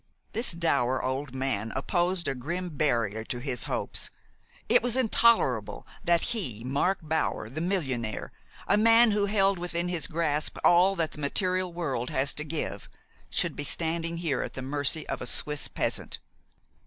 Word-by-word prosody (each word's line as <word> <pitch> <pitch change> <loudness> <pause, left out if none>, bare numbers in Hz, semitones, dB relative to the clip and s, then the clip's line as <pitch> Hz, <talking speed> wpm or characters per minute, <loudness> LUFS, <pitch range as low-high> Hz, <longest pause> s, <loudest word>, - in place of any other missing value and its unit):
This 235 +2 +3
dour 140 -7 +1
old 130 0 -3
man 130 -5 -1
opposed 175 +5 0
a - - +1
grim 170 +8 -4
barrier 115 -8 0
to 120 - -4
his 125 -1 -2
hopes. - - -2 0.6
It - - +5
was 245 +1 0
intolerable 225 - +2 0.2
that 170 -2 +3
he, 125 - 0
Mark 140 +9 +1
Bower 155 -8 -1
the 155 +4 -4
millionaire, 135 - -2 0.4
a - - +4
man 230 +1 +6
who 205 -1 +1
held 195 -2 +2
within 175 0 -2
his 175 -3 -1
grasp 155 -2 -1
all 180 +3 +5
that 165 -4 -1
the - - -10
material 185 +5 0
world 135 -8 -3
has 135 +1 +2
to 150 - -1
give, 155 +1 -4 0.4
should - - 0
be 145 - -4
standing 165 +2 -1
there 155 -7 0
at - - -5
the 130 - -6
mercy 145 +3 0
of - - -4
a 125 - -4
Swiss 150 +3 0
peasant. - - -1
160 Hz, 165 wpm, -28 LUFS, 130-180 Hz, 0.6 s, man